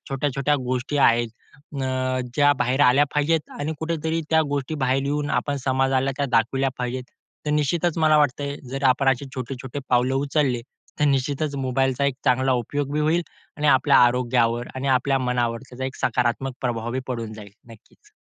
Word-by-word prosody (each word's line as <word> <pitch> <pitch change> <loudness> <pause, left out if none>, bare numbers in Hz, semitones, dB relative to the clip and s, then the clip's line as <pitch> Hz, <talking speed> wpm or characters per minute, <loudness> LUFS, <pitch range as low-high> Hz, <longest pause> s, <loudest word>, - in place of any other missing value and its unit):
छोट्या-छोट्या 140 +1 0
गोष्टी 130 +3 -2
आहेत 120 -3 +4 0.5
अ, 130 0 -1
ज्या 145 0 +5
बाहेर 125 +3 +1
आल्या 135 +4 +5
पाहिजेत 150 +2 +1
आणि 150 +2 -2
कुठेतरी 160 0 -1
त्या 160 0 +5
गोष्टीबाहेर 135 -2 -1
येऊन 145 +1 -1
आपण 145 -1 0
समाजाला 135 +1 +2
त्या 140 - 0
दाखविल्या 135 +4 +2
पाहिजेत. 125 +1 -3 0.4
तर - - 0
निश्चितच 155 +3 +1
मला 155 -1 +4
वाटतंय 140 0 0
जर 135 +1 -4
आपण 135 +1 +3
असे 135 +1 +1
छोटे-छोटे 130 +1 -6
पावलं 125 +1 +2
उचलले 140 -3 0 0.4
तर 150 - +4
निश्चितच 140 +1 0
मोबाईलचा 135 +1 0
एक 140 -2 +1
चांगला 130 0 +3
उपयोग 140 +4 -2
होईल 160 +3 +2 0.3
आणि 150 0 -1
आपल्या 130 - +5
आरोग्यावर 120 -1 +2
आणि 130 +1 -3
आपल्या 135 +1 0
मनावर 120 -2 -1
त्याचा 130 +1 -6
एक 130 - -5
सकारात्मक 125 +1 0
प्रभाव 120 0 -2
पडून 115 -4 -4
जाईल 105 -2 -11 0.2
नक्कीच. 415 - -20
135 Hz, 160 wpm, -23 LUFS, 125-145 Hz, 0.5 s, ज्या